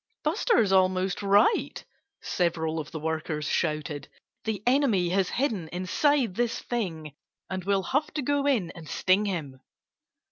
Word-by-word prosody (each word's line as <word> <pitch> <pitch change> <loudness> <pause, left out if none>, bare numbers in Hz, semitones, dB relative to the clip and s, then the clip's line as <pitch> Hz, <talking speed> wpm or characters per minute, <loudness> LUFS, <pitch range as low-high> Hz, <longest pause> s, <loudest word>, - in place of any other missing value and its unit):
"Buster's 310 - +2
almost 185 0 +2
right!" 205 - +2 0.4
several 165 -2 -1
of 150 0 -6
the 160 - -6
workers 155 -1 -3
shouted. 150 -2 -1 0.4
"The 215 -3 -2
enemy 245 -9 +3
has 185 0 +1
hidden 225 - -1
inside 225 - +1
this 235 +3 0
thing. 165 - -4 0.4
And 185 -1 -3
we'll 195 0 +1
have 285 - 0
to 295 - -1
go 285 +1 +1
in 225 -12 +1
and 160 -3 -11
sting 195 +3 +2
him." 155 -9 -4
190 Hz, 140 wpm, -27 LUFS, 165-240 Hz, 0.4 s, enemy